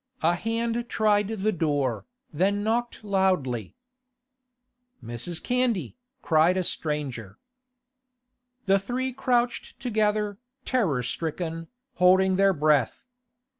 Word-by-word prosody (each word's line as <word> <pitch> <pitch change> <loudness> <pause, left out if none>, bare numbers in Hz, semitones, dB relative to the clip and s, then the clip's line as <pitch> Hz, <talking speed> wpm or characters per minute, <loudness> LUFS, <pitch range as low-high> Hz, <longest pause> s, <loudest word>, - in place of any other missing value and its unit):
A 165 +2 +4
hand 230 +4 -2
tried 210 -2 +2
the 215 -1 -1
door, 145 - -1 0.3
then 200 +6 +1
knocked 235 +1 -1
loudly. 185 - 0 1.3
'Mrs. 120 +9 -5
Candy,' 250 -6 0 0.3
cried 165 +3 +3
a 185 - +1
stranger. 135 - -4 1.3
The 195 0 +4
three 250 +6 -3
crouched 245 -2 -1
together, 210 -3 0 0.3
terror 175 - +1
stricken, 165 +4 -4 0.3
holding 185 +1 +4
their 195 0 +5
breath. 150 - +1
190 Hz, 95 wpm, -26 LUFS, 155-220 Hz, 1.3 s, their